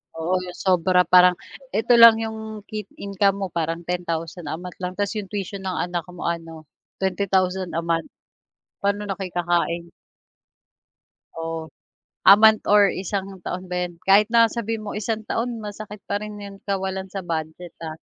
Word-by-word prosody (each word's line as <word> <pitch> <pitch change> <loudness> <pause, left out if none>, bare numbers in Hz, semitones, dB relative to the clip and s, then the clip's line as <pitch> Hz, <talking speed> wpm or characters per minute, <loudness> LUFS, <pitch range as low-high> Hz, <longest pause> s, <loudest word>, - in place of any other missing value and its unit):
Oo, 165 +3 -1
'yong 180 -1 -8
sobra 180 0 +4
parang 180 0 +6 0.4
eto 225 +3 +3
lang 230 -1 +10
'yong 220 -1 -6
ki 210 -2 -5
income 200 0 +1
mo - - -1
parang 165 +1 -2
10,000 170 -1 -4
a 145 - -2
month 180 +2 -9
lang, 180 -1 -3
tapos 205 0 -1
'yong 210 -2 -4
tuition 200 -1 -4
ng 185 -1 -3
anak 175 -2 -4
mo 175 - -7
ano, 165 -2 -4 0.4
20,000 190 -1 0
a 165 - 0
month, 165 -1 -1 0.7
paano 200 +1 0
na 195 -2 -3
kayo 190 -2 -4
kakain? 170 -1 0 1.4
Oh, 165 0 -4 0.6
a 195 - +9
month 220 0 +6
or 205 -1 +7
isang 190 0 -4
taon 185 +1 -5
ba 180 0 -2
yan, 175 -1 -16
kahit 200 +2 +6
na 230 0 +6
sabihin 225 -1 -4
mo - - -5
isang 215 0 -3
taon 235 0 -2
masakit 210 0 -8
pa 205 +1 -2
rin 210 0 -7
'yong 200 -1 -10
kawalan 190 -1 -3
sa 195 -1 -5
budget 160 +1 -5
ah, 160 -1 -6
190 Hz, 170 wpm, -23 LUFS, 175-205 Hz, 1.4 s, lang